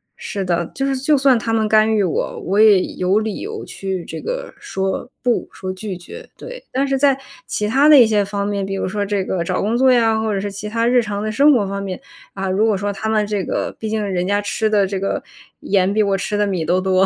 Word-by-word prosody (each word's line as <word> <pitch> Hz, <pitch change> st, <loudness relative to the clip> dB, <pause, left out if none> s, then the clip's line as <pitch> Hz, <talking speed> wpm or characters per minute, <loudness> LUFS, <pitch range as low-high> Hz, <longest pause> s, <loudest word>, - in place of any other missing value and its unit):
是 195 Hz, -2 st, -5 dB
的， 170 Hz, -2 st, -1 dB
就 270 Hz, -, -1 dB
是 275 Hz, 0 st, 0 dB
就 285 Hz, +3 st, +2 dB
算 265 Hz, -2 st, +4 dB
他 225 Hz, -, -3 dB
们 220 Hz, -1 st, +1 dB
干 215 Hz, +1 st, +4 dB
预 210 Hz, -2 st, +2 dB
我， 180 Hz, -, -2 dB
我 195 Hz, +3 st, +1 dB
也 210 Hz, -4 st, +6 dB
有 185 Hz, +2 st, +1 dB
理 220 Hz, -1 st, -3 dB
由 435 Hz, +2 st, -6 dB
去 190 Hz, -3 st, -5 dB
这 -, -, -7 dB
个 -, -, -5 dB
说 190 Hz, +6 st, -3 dB
不， 245 Hz, -1 st, +1 dB
说 185 Hz, -1 st, -6 dB
拒 190 Hz, 0 st, -6 dB
绝， 175 Hz, -, -11 dB
对。 -, -, -9 dB
但 275 Hz, +2 st, 0 dB
是 270 Hz, -, +1 dB
在 275 Hz, -1 st, +3 dB, 0.3 s
其 210 Hz, -, -2 dB
他 275 Hz, +7 st, +4 dB
的 300 Hz, -, +9 dB
一 240 Hz, -, +8 dB
些 210 Hz, -2 st, +2 dB
方 200 Hz, 0 st, -3 dB
面， 200 Hz, -1 st, -2 dB
比 195 Hz, 0 st, -4 dB
如 195 Hz, -, -2 dB
说 205 Hz, +2 st, -2 dB
这 200 Hz, -1 st, -1 dB
个 180 Hz, -3 st, -1 dB
找 -, -, -2 dB
工 215 Hz, +3 st, 0 dB
作 260 Hz, +1 st, +5 dB
呀， 225 Hz, -3 st, +3 dB
或 220 Hz, 0 st, -1 dB
者 195 Hz, -, -1 dB
是 200 Hz, +1 st, -4 dB
其 205 Hz, +2 st, -6 dB
他 230 Hz, +2 st, 0 dB
日 245 Hz, 0 st, +4 dB
常 205 Hz, -2 st, -4 dB
的 215 Hz, 0 st, -2 dB
生 280 Hz, +7 st, +5 dB
活 225 Hz, -8 st, +2 dB
方 200 Hz, +1 st, -4 dB
面， 190 Hz, -2 st, -5 dB, 0.3 s
啊， 195 Hz, 0 st, -4 dB
如 200 Hz, +4 st, +2 dB
果 215 Hz, -3 st, +2 dB
说 200 Hz, +1 st, -2 dB
他 220 Hz, +2 st, -4 dB
们 215 Hz, -1 st, +2 dB
这 205 Hz, -2 st, -1 dB
个 -, -, -3 dB
毕 220 Hz, -, -4 dB
竟 215 Hz, 0 st, -1 dB
人 185 Hz, -3 st, -1 dB
家 205 Hz, +1 st, +1 dB
吃 205 Hz, +2 st, -1 dB
的 205 Hz, -2 st, +3 dB
这 195 Hz, -1 st, -3 dB
个 195 Hz, -, -2 dB, 0.4 s
盐 195 Hz, 0 st, +1 dB
比 215 Hz, -, +2 dB
我 200 Hz, -1 st, +1 dB
吃 200 Hz, +2 st, -3 dB
的 205 Hz, -, +1 dB
米 185 Hz, -4 st, -1 dB
都 175 Hz, +3 st, +2 dB
多， 190 Hz, 0 st, +3 dB
210 Hz, 280 characters per minute, -19 LUFS, 195-230 Hz, 0.4 s, 的